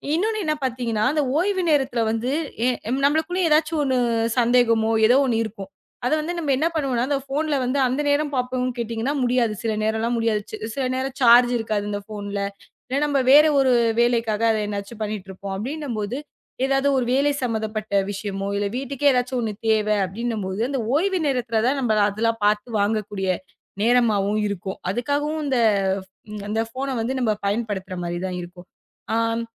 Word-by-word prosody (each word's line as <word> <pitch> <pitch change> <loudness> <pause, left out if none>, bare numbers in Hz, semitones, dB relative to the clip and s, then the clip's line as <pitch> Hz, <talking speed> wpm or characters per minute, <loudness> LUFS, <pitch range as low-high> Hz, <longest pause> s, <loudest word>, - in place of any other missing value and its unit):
இன்னொன்னு 435 +5 0
என்ன 305 - +1
பார்த்தீங்கன்னா, 235 -4 -1
அந்த 300 -2 +1 0.2
ஓய்வு 375 0 0
நேரத்துல 260 -5 +1
வந்து 235 +4 -1 0.4
எ - - +4 0.4
நம்மளுக்குள்ள 320 +5 0
எதாச்சு 310 +1 +2
ஒண்ணு 260 -2 +1 0.4
சந்தேகமோ 230 -2 +3 0.2
ஏதோ 250 +3 +5
ஒண்ணு 230 -2 +1
இருக்கும். 195 -3 -8 0.3
அத 245 - +1
வந்து 330 +3 -3
நம்ம 300 -5 -1
என்ன 320 +4 +2
பண்ணுவோம்னா, 265 -6 0
அந்தப் 275 -2 -1
போன்ல 300 +1 0
வந்து 255 +3 0
அந்த 260 +4 -1
நேரம் 290 0 +1
பார்ப்போம்னு 255 0 -1
கேட்டீங்கன்னா 230 +4 -2
முடியாது. 240 -3 +2
சில 225 -1 0
நேரம்லாம் 220 +2 0
முடியாது. 225 -2 +1
ச் - - -4 0.2
சில 270 - -1
நேரம் 260 +1 -3
சார்ஜ் 245 0 +7
இருக்காது 215 -2 -2
அந்தப் 205 0 -5
போன்ல. 205 -1 -4 0.5
இல்ல 260 - -1
நம்ம 285 -2 +1
வேற 295 +2 +9 0.2
ஒரு 265 -1 +4 0.3
வேலைக்காக 230 -3 +1
அதை 215 - 0
ஏதாச்சும் 205 +2 -6
பண்ணிட்டு 210 -3 -4
இருப்போம் 195 +1 -6
அப்படின்னு 285 +7 -5
போது, 210 +5 -3 0.5
ஏதாவது 270 +1 +1
ஒரு 255 - +1
வேலை 280 +2 +3
சம்பந்தப்பட்ட 215 -3 -2 0.2
விஷயமோ, 195 -1 -4
இல்ல 205 - 0
வீட்டுக்கே 275 +2 +1
ஏதாச்சு 250 +1 0
ஒண்ணு 220 -2 -2 0.2
தேவை 215 -1 +2
அப்படின்னும் 220 +2 -3
போது, 190 +2 -4
அந்த 275 -2 -1 0.2
ஓய்வு 375 +3 +1
நேரத்துல 240 -5 0
தான் 275 +2 +1
நம்ம 230 -3 +1 0.2
அதெல்லாம் 225 +2 -1
பாத்து 210 +3 +1
வாங்கக்கூடிய 205 -2 -1 0.5
நேரமாகவும் 215 -3 +2
இருக்கும். 190 -1 -5
அதுக்காகவும் 290 +7 -1
அந்த 265 -3 0 0.9
அந்தப் 225 +1 -2
போன 270 0 -2
வந்து 245 +4 -1
நம்ம 230 -3 +2 0.2
பயன்படுத்துற 200 -3 -2
மாரி 175 0 -3
தான் 180 -1 -4
இருக்கும். 175 +1 -12 0.5
ஆம் 230 0 0
235 Hz, 165 wpm, -23 LUFS, 215-270 Hz, 0.9 s, வேற